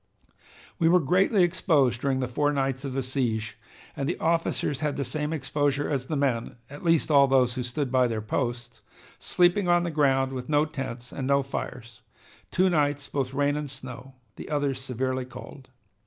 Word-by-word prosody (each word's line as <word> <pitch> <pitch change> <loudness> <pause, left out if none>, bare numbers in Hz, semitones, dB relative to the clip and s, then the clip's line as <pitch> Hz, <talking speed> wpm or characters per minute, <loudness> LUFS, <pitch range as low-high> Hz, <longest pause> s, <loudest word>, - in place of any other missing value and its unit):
"We 165 -2 +4
were 180 +1 +6
greatly 185 - +3
exposed 145 -8 +2
during 135 -1 0
the 130 - -1
four 145 +4 +1
nights 135 -1 -1
of 135 -2 -4
the 135 0 -1
siege, 120 -4 -2 0.4
and 140 +1 -2
the 175 - -2
officers 165 -4 0
had 150 -1 -1
the 140 - -1
same 150 +3 -2
exposure 145 -1 0
as 130 -2 -2
the 155 - -2
men, 130 -5 -1 0.2
at 145 - -10
least 165 -2 +2
all 140 -1 +6
those 130 -2 +3
who 125 - -3
stood 125 +2 -3
by 130 -1 +4
their 115 -2 -2
posts, 120 0 -3 0.4
sleeping 180 +2 +2
on 175 0 +4
the 170 - -2
ground 135 -3 +2
with 125 +1 -6
no 150 0 +3
tents 135 -6 -6
and 130 -2 -4
no 140 0 +3
fires, 120 -3 -6 0.5
two 185 +1 +2
nights 145 -4 +1
both 135 -3 -2
rain 145 +1 +2
and 150 -1 -4
snow, 130 -1 -8 0.2
the - - -8
others 145 -3 -1
severely 130 0 -2
cold. 130 +1 -11
135 Hz, 185 wpm, -26 LUFS, 130-150 Hz, 0.5 s, were